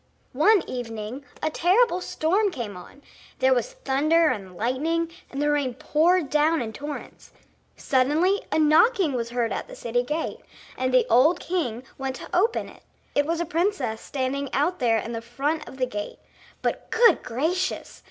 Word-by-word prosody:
One 390 +8 +4
evening 240 +1 -6 0.2
a 310 - +1
terrible 370 +3 +3
storm 385 +6 +1
came 235 - -6
on; 180 +10 -13 0.3
there 260 0 +4
was 260 - -1
thunder 315 - +2
and 190 -7 -5
lightning, 320 - -1 0.2
and 275 - -6
the 295 0 +2
rain 280 -4 0
poured 320 +2 +2
down 310 +2 +3
in 220 -2 -4
torrents. 290 +3 -8 0.5
Suddenly 300 +10 +2
a - - +1
knocking 315 - +4
was 235 -2 -2
heard 235 -1 -1
at - - -4
the - - -10
city 240 +1 -1
gate, 300 +6 -3 0.4
and 255 0 -1
the 255 0 +4
old 280 +9 +4
king 260 -10 -2 0.2
went 265 -1 -3
to - - -7
open 430 +6 +1
it. - - -15 0.3
It 285 0 +1
was 335 0 0
a 345 - 0
princess 335 - -1
standing 275 +1 -3
out 305 +7 +1
there 235 -3 +3
in 230 +1 -4
front 275 +7 -3
of 265 - -12
the 255 - +1
gate. 210 -4 -6 0.5
But, - - -2
good 465 0 +5
gracious! 325 +10 -2
285 Hz, 170 wpm, -25 LUFS, 245-335 Hz, 0.5 s, good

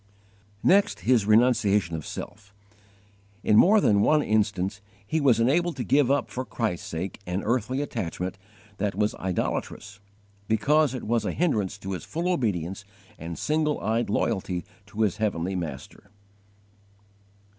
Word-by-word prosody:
3. - - +3
Next, 200 +2 +3
his 120 -5 +2
renunciation 105 -6 +3
of 80 - -6
self. 100 -2 -9 0.9
In 105 - +3
more 205 - +6
than 100 - +3
one 150 +6 +3
instance 105 -2 0 0.2
he 160 +8 -1
was 130 -5 +4
enabled 160 +8 +2
to 130 - -3
give 135 +3 +3
up 135 -6 +1
for 125 +5 -3
Christ's 110 -6 -3
sake 85 +4 -5
an 90 +2 -2
earthly 125 +4 0
attachment 95 - -4 0.4
that 100 -1 -1
was 105 +1 +1
idolatrous, 95 +2 -3 0.5
because 140 +5 +2
it 125 - -6
was 115 0 0
a 95 - -2
hindrance 110 - 0
to 95 -1 -7
his 90 - -4
full 170 +3 -3
obedience 95 - -2 0.4
and 85 +1 -6
single 155 -1 0
eyed 115 +2 -1
loyalty 95 -5 -1 0.2
to 105 +2 -5
his 105 -5 +1
heavenly 95 -4 -1
Master. 90 +3 -7
110 Hz, 145 wpm, -26 LUFS, 95-130 Hz, 0.9 s, more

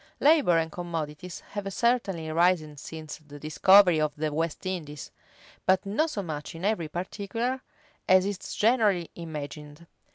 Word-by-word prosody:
Labor 285 - +5
and 160 0 0
commodities 165 0 -5
have 200 -1 -4
certainly 195 -9 0
risen 165 -2 +2
since 155 +1 -8
the 145 -1 -13
discovery 180 +3 +5
of 155 -1 0
the 150 0 -2
West 165 +2 -2
Indies; 155 -6 -5 0.6
but 190 +1 +3
not 260 +12 +1
so 205 -9 -3
much 155 -1 -6
in 165 +3 -5
every 205 -6 0
particular 215 +9 -3 0.5
as 185 0 +6
is 200 -2 -2 0.2
generally 210 -7 +2
imagined. 150 -1 -8
175 Hz, 140 wpm, -27 LUFS, 155-200 Hz, 0.6 s, as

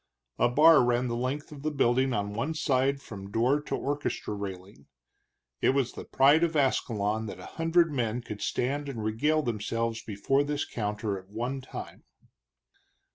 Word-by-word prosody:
A 120 - +4
bar 155 +3 +7
ran 120 +1 +1
the 120 - -1
length 130 +5 -3
of 145 -2 -9
the 155 - -1
building 130 -2 +2
on 100 -3 -2
one 140 +9 -2
side 140 -2 +1
from 100 -5 -9
door 125 +8 +2
to - - -3
orchestra 145 -6 -3
railing. 95 -5 -7 0.7
It 130 - +3
was 135 -3 +1
the - - -8
pride 145 +5 +4
of 165 -1 +1
Ascalon 110 -6 +1
that - - -7
a - - -9 0.2
hundred 165 0 +3
men 120 -2 -1
could 105 -3 -8
stand 140 +3 -1
and 115 -5 -5
regale 150 +9 +1
themselves 115 0 -2
before 125 +7 0
this 145 0 -2
counter 105 -2 -3
at 95 +1 -18
one 120 +6 -3
time. 130 - -9
125 Hz, 170 wpm, -28 LUFS, 110-145 Hz, 0.7 s, bar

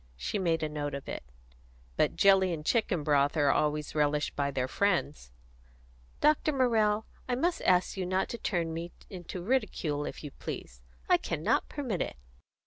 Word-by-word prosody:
She 200 - -2
made 165 -3 +1
a - - +1
note 145 -1 -3
of 140 - -7
it. - - -4 0.7
"But - - +2
jelly 190 -2 +5
and 155 -3 -4
chicken 185 -8 +1
broth 145 +1 +2
are 145 -2 +4
always 150 0 0
relished 150 0 +1
by 140 -1 0
their 130 -2 -1
friends." 150 - 0 0.9
"Dr. 305 +1 +4
Morrell, 220 -5 +2 0.2
I 245 - +2
must 335 +7 0
ask 180 0 +3
you 185 -1 -2
not 185 +1 +1
to 235 - -5
turn 170 -5 -1
me 170 +1 -5 0.2
into 180 -1 -7
ridicule, 180 - 0
if - - -7
you 145 - -6
please. 60 - -7 0.3
I - - +5
cannot 205 +10 0
permit 250 - -3
it." - - -3
175 Hz, 170 wpm, -30 LUFS, 150-210 Hz, 0.9 s, jelly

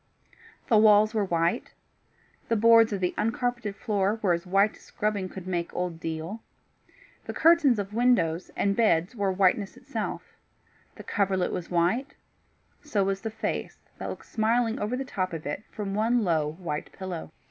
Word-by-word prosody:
The 225 -5 +5
walls 215 0 +6
were 215 -2 +1
white; 170 -2 -1 0.7
the 230 - +3
boards 230 0 +6
of 200 -2 -2
the 180 - 0
uncarpeted 235 -2 -1
floor 205 -1 0
were 185 -4 +4
as 170 +2 -3
white 195 +3 +3
as - - -19
scrubbing 205 -3 -2
could 185 -1 -9
make 175 -2 -2
old 175 -2 -3
deal; 165 +7 -5 0.8
the - - -6
curtains 320 -7 +5
of 205 0 -4
windows 200 -8 +2
and 200 0 +1
bed 190 -4 +2
were 200 -4 0
whiteness 190 +1 +1
itself; - - -4 0.7
the - - -10
coverlet 190 -3 0
was 175 - -4
white; 180 +10 0 0.7
so 220 -10 0
was 195 0 -1
the 225 - -3
face 220 0 -4 0.2
that - - -4
looked - - -8
smiling 225 +1 +1
over 215 +5 -2
the 270 - -3
top 185 -8 -3
of 160 -2 -6
it 145 - -3
from 205 -2 -5
the - - -2
one 230 +2 +2
low 155 -5 +1
white 160 -3 -5
pillow. 185 -5 -6
200 Hz, 170 wpm, -27 LUFS, 180-225 Hz, 0.8 s, walls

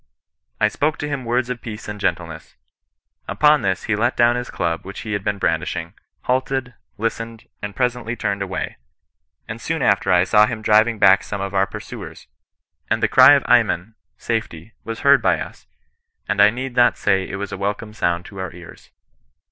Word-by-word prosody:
" 80 +3 -52
I 105 - +4
spoke 145 +7 -1
to 150 - -4
him 140 -4 -4
words 120 +1 0
of 120 -2 -5
peace 110 -1 -8
and 105 0 -6
gentleness. 85 -5 -3 0.7
Upon 150 0 +4
this 95 -3 -1
he 110 - 0
let 115 +3 0
down 120 0 +4
his 125 0 -4
club 85 -1 -2
which 95 +1 -8
he 105 - -5
had 100 -1 -2
been 100 0 -1
brandish - - -1
ing, - - -6 0.3
halted, 130 0 -1 0.2
listened, 115 +1 -4
and 105 -1 -6
presently 125 -2 -1
turned 100 -3 -2
away; 95 -1 -4 0.7
and - - -7
soon - - -2
after - - +2
I 90 -1 +5
saw 105 +2 +4
him 110 -3 -5
driving 110 +2 +4
back 95 -2 +6
some 100 - -6
of 100 0 -4
our 95 0 +2
pursuers, 95 - -9 0.7
suid - - +1
the - - +3
cry - - +8
of - - +1
ayman 95 +7 +2 0.2
(safety) 110 -4 -4
was 115 0 -6
heard - - +5
by - - +2
us; - - -9 0.6
and 100 - +1
I 100 - +8
need 125 +2 -5
not 120 -1 +4
say 95 -2 +1
it - - -5
was 100 0 -5
a - - -3
welcome 105 +2 -3
sound 85 -4 -1
to 100 - -10
our 95 -2 -4
ears. 85 -1 -14
105 Hz, 195 wpm, -21 LUFS, 95-120 Hz, 0.7 s, cry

